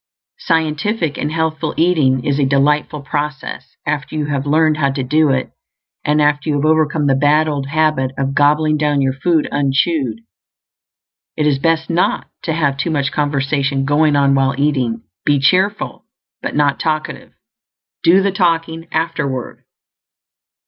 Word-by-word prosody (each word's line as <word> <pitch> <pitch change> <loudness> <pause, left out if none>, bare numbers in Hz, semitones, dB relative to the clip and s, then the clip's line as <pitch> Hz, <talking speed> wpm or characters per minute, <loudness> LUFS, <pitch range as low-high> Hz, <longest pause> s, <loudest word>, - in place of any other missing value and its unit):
Scientific 160 +1 -1
and 150 - -2
healthful 160 -1 -2
eating 150 -7 +2
is 140 0 0
a - - +3
delightful 140 +2 +1
process 150 -3 -5
after 145 0 -3
you 150 -1 -1
have 140 -1 -2
learned 155 +1 +3
how 140 -3 +1
to 135 -1 -3
do 150 +4 +2
it, 130 -1 -1 0.5
and 150 +1 +1
after 150 0 +1
you 150 - +1
have 145 +1 0
overcome 155 -1 +2
the 135 - +3
bad 150 +3 +3
old 140 -3 -3
habit 155 -3 +1
of 135 0 -1
gobbling 150 +2 +3
down 150 -1 +1
your 135 -1 +1
food 155 +3 0
unchewed. 135 -4 0 1.2
It 150 - +1
is 145 -3 +2
best 160 +2 +1
not 170 +1 0 0.2
to 160 - -1
have 145 -4 0
too 155 - -2
much 145 -2 0
conversation 140 -1 -1
going 145 +1 +2
on 140 -1 +3
while 135 0 +1
eating; 130 -6 0 0.2
be 145 -1 +2
cheerful, 190 +9 +1 0.4
but - - -4
not 145 -1 +1
talkative; 155 -1 -3 0.7
do 180 +3 +5
the 200 - +1
talking 165 -3 -1
afterward. 150 -6 -3
150 Hz, 155 wpm, -17 LUFS, 140-160 Hz, 1.2 s, do